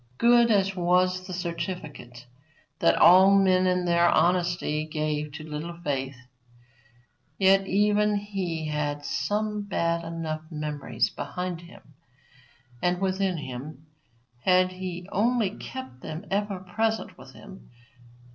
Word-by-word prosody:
Good 235 Hz, 0 st, +5 dB
as 195 Hz, -3 st, +2 dB
was 185 Hz, +1 st, +1 dB
the -, -, -7 dB
certificate 165 Hz, -8 st, -6 dB, 0.5 s
that 170 Hz, -, +4 dB
all 190 Hz, +2 st, +7 dB
men 185 Hz, -1 st, +3 dB
in 180 Hz, 0 st, +1 dB
their 170 Hz, 0 st, +4 dB
honesty 175 Hz, -2 st, +1 dB
gave 150 Hz, -1 st, -2 dB
to 155 Hz, +1 st, -8 dB
Little 160 Hz, +3 st, -6 dB
Faith, 135 Hz, -3 st, -2 dB, 1.2 s
yet 195 Hz, 0 st, +4 dB
even 210 Hz, +1 st, +2 dB
he 190 Hz, -6 st, -3 dB
had 145 Hz, -1 st, -2 dB
some 210 Hz, 0 st, -1 dB
bad 170 Hz, -4 st, -1 dB
enough 165 Hz, -2 st, -4 dB
memories 150 Hz, -7 st, -2 dB
behind 180 Hz, -2 st, -5 dB
him 170 Hz, -3 st, -16 dB, 0.9 s
and 180 Hz, 0 st, +1 dB
within 190 Hz, -1 st, 0 dB
him 140 Hz, +2 st, -8 dB, 0.5 s
had 185 Hz, +4 st, +3 dB
he 185 Hz, -1 st, -6 dB
only 225 Hz, -1 st, +1 dB
kept 260 Hz, -, -9 dB
them 155 Hz, +1 st, -7 dB
ever 200 Hz, -1 st, -1 dB
present 220 Hz, +4 st, -2 dB
with 130 Hz, +1 st, -14 dB
him. 190 Hz, -, -13 dB
180 Hz, 120 wpm, -26 LUFS, 155-195 Hz, 1.2 s, all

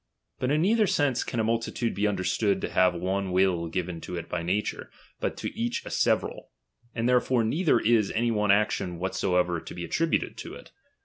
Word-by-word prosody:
But 125 Hz, -, 0 dB
in 150 Hz, +3 st, +2 dB
neither 215 Hz, +2 st, +3 dB
sense 145 Hz, -7 st, +1 dB
can 120 Hz, -, -3 dB
a -, -, +2 dB
multitude 115 Hz, +1 st, -1 dB
be 105 Hz, +1 st, +1 dB
understood 100 Hz, +1 st, 0 dB
to -, -, -3 dB
have 90 Hz, -1 st, +3 dB
one 95 Hz, +2 st, -2 dB
will 90 Hz, -2 st, +2 dB
given 85 Hz, 0 st, -4 dB
to 90 Hz, -, -6 dB
it 85 Hz, -1 st, -5 dB
by 90 Hz, -, -3 dB
nature, 95 Hz, +5 st, -2 dB, 0.3 s
but -, -, -2 dB
to -, -, -5 dB
each 120 Hz, +1 st, -2 dB
a -, -, -7 dB
several; -, -, 0 dB, 0.5 s
and 115 Hz, 0 st, 0 dB
therefore 125 Hz, -1 st, +3 dB
neither 145 Hz, +3 st, +2 dB
is 110 Hz, -3 st, +3 dB
any 115 Hz, +1 st, +1 dB
one 105 Hz, -2 st, 0 dB
action 100 Hz, -3 st, +2 dB
whatsoever 90 Hz, -1 st, 0 dB
to -, -, -9 dB
be 85 Hz, -1 st, -5 dB
attributed 165 Hz, -, 0 dB
to -, -, -7 dB
it. -, -, -13 dB
105 Hz, 195 wpm, -27 LUFS, 90-120 Hz, 0.5 s, neither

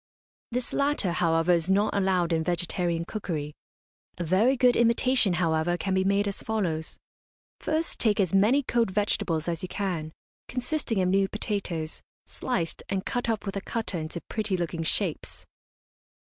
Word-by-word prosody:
This 250 Hz, +1 st, -3 dB
latter, 280 Hz, -10 st, +1 dB
however, 165 Hz, 0 st, +2 dB
is 170 Hz, 0 st, +2 dB
not 205 Hz, +3 st, +3 dB
allowed 185 Hz, -3 st, +2 dB
in 160 Hz, 0 st, +1 dB
vegetarian 175 Hz, 0 st, -1 dB
cookery. 160 Hz, -8 st, -4 dB, 0.6 s
A 175 Hz, -, -2 dB
very 205 Hz, +11 st, +3 dB
good 250 Hz, -1 st, +5 dB
imitation, 235 Hz, -2 st, +3 dB
however, 170 Hz, 0 st, +1 dB
can 190 Hz, +1 st, -2 dB
be 190 Hz, 0 st, +2 dB
made 200 Hz, +1 st, +2 dB
as 200 Hz, -, -3 dB
follows: 175 Hz, -8 st, -2 dB, 0.6 s
First 315 Hz, +1 st, -1 dB
take 215 Hz, -3 st, +2 dB
as 185 Hz, -3 st, +1 dB
many 220 Hz, +9 st, +4 dB
cold 235 Hz, -4 st, +1 dB
vegetables 190 Hz, -5 st, 0 dB
as 170 Hz, -2 st, -2 dB
you 185 Hz, -, -5 dB
can, 175 Hz, -7 st, -3 dB, 0.4 s
consisting 245 Hz, -5 st, -1 dB
of 180 Hz, -, +1 dB
new 195 Hz, +1 st, +3 dB
potatoes, 190 Hz, -6 st, -3 dB, 0.2 s
sliced, 175 Hz, -10 st, -3 dB
and 195 Hz, -1 st, -1 dB
cut 245 Hz, -1 st, -2 dB
up 220 Hz, -2 st, -1 dB
with 195 Hz, -, -4 dB
a 195 Hz, -, -2 dB
cutter 220 Hz, -5 st, -3 dB
into 160 Hz, +2 st, -5 dB
pretty 210 Hz, -3 st, -2 dB
looking 170 Hz, -1 st, -2 dB
shapes. 160 Hz, -, -2 dB
190 Hz, 160 wpm, -27 LUFS, 170-220 Hz, 0.6 s, good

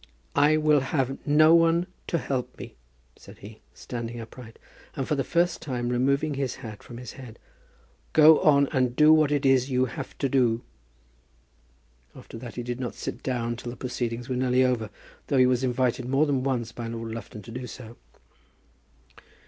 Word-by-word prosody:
"I 145 Hz, +2 st, +4 dB
will 155 Hz, -1 st, +4 dB
have 135 Hz, 0 st, -2 dB
no 155 Hz, +2 st, +6 dB
one 165 Hz, +1 st, +4 dB, 0.2 s
to 170 Hz, -, 0 dB
help 130 Hz, -5 st, -3 dB
me," -, -, -9 dB, 0.4 s
said -, -, -15 dB
he, 105 Hz, +2 st, -13 dB
standing 120 Hz, -1 st, -6 dB
upright, 115 Hz, 0 st, -11 dB, 0.4 s
and 135 Hz, -, -3 dB
for -, -, 0 dB
the 140 Hz, -2 st, 0 dB
first 175 Hz, +3 st, 0 dB
time 120 Hz, -4 st, -3 dB
removing 140 Hz, +5 st, +1 dB
his 135 Hz, -2 st, -2 dB
hat 110 Hz, -2 st, -8 dB
from 120 Hz, -, -11 dB
his 125 Hz, -2 st, -8 dB
head. 125 Hz, -4 st, -11 dB, 0.8 s
"Go 155 Hz, 0 st, +7 dB
on, 140 Hz, -2 st, +4 dB
and 130 Hz, -4 st, 0 dB
do 155 Hz, +2 st, +6 dB
what 155 Hz, -2 st, +3 dB
it 145 Hz, -1 st, 0 dB
is 135 Hz, 0 st, +3 dB
you 130 Hz, -1 st, +2 dB
have 135 Hz, +3 st, -8 dB
to 140 Hz, -, 0 dB
do." 120 Hz, -3 st, +1 dB, 1.5 s
After 115 Hz, -, -11 dB
that 120 Hz, -1 st, -9 dB
he 120 Hz, -, -4 dB
did 120 Hz, +1 st, -4 dB
not 125 Hz, -2 st, -4 dB
sit 120 Hz, -, -6 dB
down 120 Hz, -2 st, -2 dB
till 120 Hz, -, -7 dB
the 120 Hz, -, -8 dB
proceedings 120 Hz, -2 st, -4 dB
were 130 Hz, -, -2 dB
nearly 130 Hz, 0 st, +2 dB
over, 120 Hz, -4 st, -1 dB, 0.4 s
though 140 Hz, -, +1 dB
he 130 Hz, -, +6 dB
was 125 Hz, 0 st, +1 dB
invited 125 Hz, 0 st, 0 dB
more 135 Hz, +3 st, +3 dB
than 140 Hz, -3 st, 0 dB
once 125 Hz, -4 st, -2 dB
by 115 Hz, 0 st, -6 dB
Lord 115 Hz, 0 st, -5 dB
Lufton 110 Hz, -2 st, -8 dB
to 115 Hz, -, -11 dB
do 125 Hz, +1 st, -6 dB
so. 115 Hz, -1 st, -10 dB
130 Hz, 185 wpm, -26 LUFS, 120-140 Hz, 1.5 s, Go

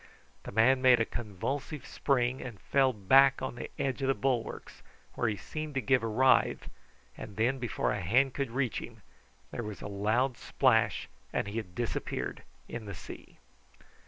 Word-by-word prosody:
The -, -, -6 dB
man 130 Hz, +4 st, +4 dB
made 130 Hz, -2 st, +6 dB
a 115 Hz, -, +2 dB
convulsive 120 Hz, -, -4 dB
spring, 130 Hz, -1 st, 0 dB
and 120 Hz, -6 st, -8 dB
fell 135 Hz, -2 st, +3 dB
back 135 Hz, +6 st, +5 dB
on 130 Hz, -1 st, -3 dB
the 120 Hz, -, -7 dB
edge 135 Hz, 0 st, -1 dB
of 135 Hz, -, 0 dB
the 135 Hz, -, +3 dB
bulwarks, 125 Hz, -4 st, -2 dB, 0.3 s
where 120 Hz, -, 0 dB
he 105 Hz, -, 0 dB
seemed 155 Hz, -, -6 dB
to -, -, +2 dB
give 135 Hz, 0 st, +3 dB
a 115 Hz, -, -2 dB
writhe, 130 Hz, +4 st, +3 dB, 0.4 s
and 100 Hz, -, -9 dB
then, 125 Hz, +5 st, +1 dB
before 120 Hz, -2 st, -1 dB
a 100 Hz, -, -2 dB
hand 125 Hz, +9 st, +3 dB
could 140 Hz, -3 st, -2 dB
reach 125 Hz, -1 st, -1 dB
him, -, -, -11 dB, 0.5 s
there -, -, -4 dB
was 105 Hz, -3 st, -6 dB
a -, -, -4 dB
loud 110 Hz, +6 st, 0 dB
splash, -, -, +2 dB, 0.2 s
and -, -, -1 dB
he 105 Hz, -, -5 dB
had 95 Hz, -6 st, -5 dB
disappeared 120 Hz, -1 st, -3 dB, 0.3 s
in 115 Hz, -2 st, -6 dB
the 100 Hz, -, -6 dB
sea. -, -, -11 dB
120 Hz, 180 wpm, -30 LUFS, 110-135 Hz, 0.5 s, made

